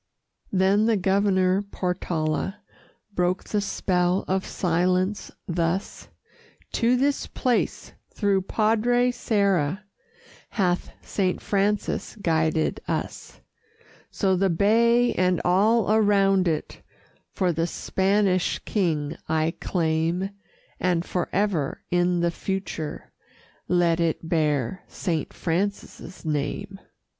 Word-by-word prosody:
Then 195 +3 +3
the 225 -2 +3
Governor 190 0 +2
Portala 180 -2 -2 0.6
Broke 180 0 0
the 210 - -1
spell 180 -2 0
of 190 0 -1
silence 185 +3 0 0.2
thus: 170 +2 -2 0.6
"To 235 +2 +2
this 280 +3 0
place, 250 -2 -1 0.2
through 200 -2 +1
Padre 230 +5 +2
Serra, 200 -6 0 0.7
Hath 180 -4 0
Saint 185 -3 -1
Francis 205 +1 -1
guided 160 -5 0
us; - - -4 0.7
So 190 -2 +1
the 190 +1 +2
bay 235 +7 +3
and 180 -1 +2
all 205 +4 +3
around 195 -3 +3
it 155 -2 -2 0.5
For 180 -3 0
the 165 +1 0
Spanish 190 -1 +1
King 160 -8 0
I 160 +1 +1
claim, 165 +2 0 0.5
And 175 -1 +1
forever, 180 -4 -1
in 175 0 +2
the 170 0 +2
future, 185 -5 -5 0.5
Let 175 -2 +2
it 165 -1 -1
bear 155 -1 0
Saint 165 -6 -3
Francis' 185 0 -3
name." 175 +7 -3
185 Hz, 100 wpm, -25 LUFS, 170-200 Hz, 0.7 s, Then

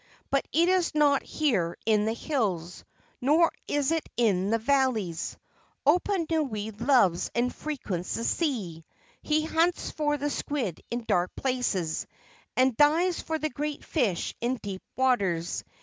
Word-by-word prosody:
But 275 - +1
it 335 +3 +3
is 365 -3 +2
not 290 -2 +4
here 205 - 0
in 215 -2 +3
the 220 - 0
hills, 200 - -2 0.4
nor 310 +6 +4 0.2
is 290 0 +1
it 325 -1 -1
in 200 -5 +2
the 225 - +3
valleys. 230 - 0 0.5
Oponui 310 - +1 0.2
loves 195 -11 +4
and 245 +1 +1
frequents 210 - -4
the 230 - -3
sea. 215 - -1 0.4
He 310 0 +1
hunts 330 +2 +1
for 295 -1 0
the 290 +1 -2
squid 250 - -3
in 240 0 -3
dark 180 -4 0
places, 235 -11 -1 0.5
and 255 -1 +4
dives 320 +6 +3
for 320 - -2
the 310 0 -2
great 295 +3 -4
fish 225 - 0
in 245 +2 +1
deep 200 -5 -6
waters. 195 -10 +1
255 Hz, 140 wpm, -27 LUFS, 205-300 Hz, 0.5 s, not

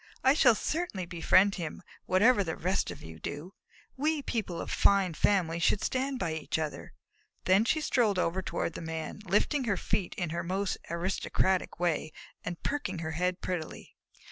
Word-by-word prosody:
I 265 - +6
shall 245 -6 +5
certainly 300 - -2
befriend 185 +3 +4
him, 165 +2 -6 0.2
whatever 205 +3 +5
the 160 -3 -3
rest 185 +4 0
of - - -8
you 80 0 -10
do. 150 - -6 0.4
We 300 +1 0
people 195 -10 -2
of - - -5
fine 195 -3 +3
families 170 -1 +1
should 195 +5 +3
stand 265 +1 -1
by 170 -9 -1
each 160 -1 -2
other." 155 -2 -5 0.5
Then 190 +4 +4
she 310 +6 +1
strolled 235 -9 +2
over 180 +1 0
toward 170 - -2
the - - -6
Man, 160 +2 -5
lifting 255 - +2
her 205 -4 +1
feet 180 +1 -1
in 175 -4 -2
her 170 - -2
most 190 +2 -2
aristocratic 185 +1 0
way 165 -3 0 0.3
and 175 -1 -6
perking 275 -11 -2
her 160 -1 -3
head 180 +3 -1
prettily. 175 -4 -5
185 Hz, 170 wpm, -30 LUFS, 170-210 Hz, 0.5 s, I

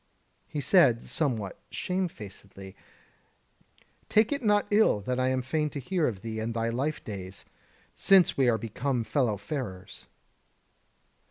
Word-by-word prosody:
He 145 - -4
said, 135 - +4
somewhat 115 - -1
shame 185 0 -1
facedly: 100 - -11 1.3
"Take 215 +3 +4
it 285 -1 -1
not 205 -1 +3
ill 205 - +4
that 125 +5 -2
I 130 - +2
am 130 -1 0
fain 150 +4 -1
to 145 - -6
hear 170 +4 0
of 100 -6 -4
thee 110 -1 -4
and 115 +1 -3
thy 115 0 0
life 135 +6 -2
days, 95 -2 -7 0.5
since 190 -3 +5
we 130 -3 +3
are 115 - +2
become 125 +2 -2
fellow 110 -1 0
farers." 105 -5 -6
125 Hz, 145 wpm, -28 LUFS, 110-155 Hz, 1.3 s, since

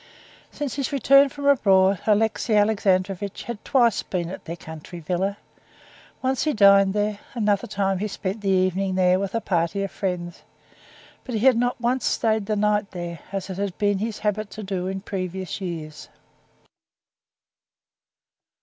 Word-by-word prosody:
Since 290 -3 -5
his 275 0 -2
return 275 0 +5
from 285 +1 -7
abroad 195 -8 +4
Alexey 220 +1 +2
Alexandrovitch 200 -2 +1
had 235 -3 -7
twice 240 -5 +3
been 175 -2 -3
at - - -9
their 165 - -5
country 160 +1 -10
villa. 185 +5 -2 0.9
Once 260 0 +1
he 305 - +1
dined 200 -2 +5
there, 210 0 0 0.2
another 210 0 +1
time 195 -2 -1
he 210 - -1
spent 200 +1 -4
the 200 - -1
evening 185 0 +1
there 185 0 +3
with 200 +2 -3
a 230 - 0
party 175 +1 0
of 195 - -4
friends, 180 -3 -4 0.8
but 250 - -5
he 220 +3 0
had 260 -2 +7
not 245 +2 0
once 245 +2 0
stayed 220 -3 +1
the 215 - 0
night 210 0 +1
there, 175 -2 -6
as 195 -1 -4
it 185 - -6
had 200 -3 -3
been 205 -2 +1
his 220 +1 -3
habit 210 0 -2
to 215 - -8
do 190 -2 -3
in 190 0 -4
previous 190 -1 -5
years. 160 -4 -6
200 Hz, 160 wpm, -24 LUFS, 185-220 Hz, 0.9 s, had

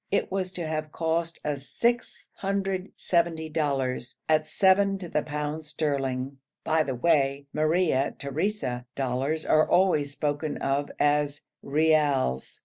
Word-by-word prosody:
It 200 - 0
was 185 -1 -1
to 175 -2 -3
have 155 -1 -3
cost 165 +1 -1
us 140 -2 -2
670 190 -7 -1
dollars, 135 -5 -1
at 155 0 +3
seven 195 +3 +3
to 185 -2 -7
the 150 - 0
pound 150 +1 -4
sterling. 140 -3 -2 0.2
By 160 0 +2
the 135 -4 -1
way, 140 0 +2
Maria 155 -3 +2
Theresa 140 -4 -2
dollars 135 +4 -1
are 155 0 +4
always 165 -6 +3
spoken 145 +1 -2
of 140 +1 -1
as 145 0 +2 0.2
reals. 145 - +1
155 Hz, 125 wpm, -27 LUFS, 140-170 Hz, 0.2 s, are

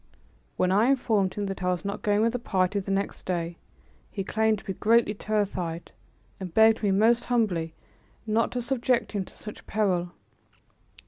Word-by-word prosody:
When 185 0 +2
I 205 +4 +4
informed 220 -8 +1
him 205 - -2
that 195 -1 -5
I 180 - 0
was 180 +2 -2
not 200 - -3
going 205 0 +2
with 230 +1 +2
the 245 - -2
party 190 -3 0
the 195 - -7
next 195 +1 -2
day, 170 -2 -2 0.5
he 195 - -4
claimed 220 +2 +1
to - - -14
be 190 - -3
greatly 225 +2 +3
terrified 195 -6 -2 0.5
and 185 -3 -6
begged 220 +3 +5
me 205 - +1
most 225 +5 +3
humbly 180 -10 0 0.5
not 225 +1 +1
to 245 -1 -2
subject 245 -1 0
him 200 -3 -2
to - - -16
such 210 - -10
peril. 180 -4 0
205 Hz, 180 wpm, -27 LUFS, 185-220 Hz, 0.5 s, begged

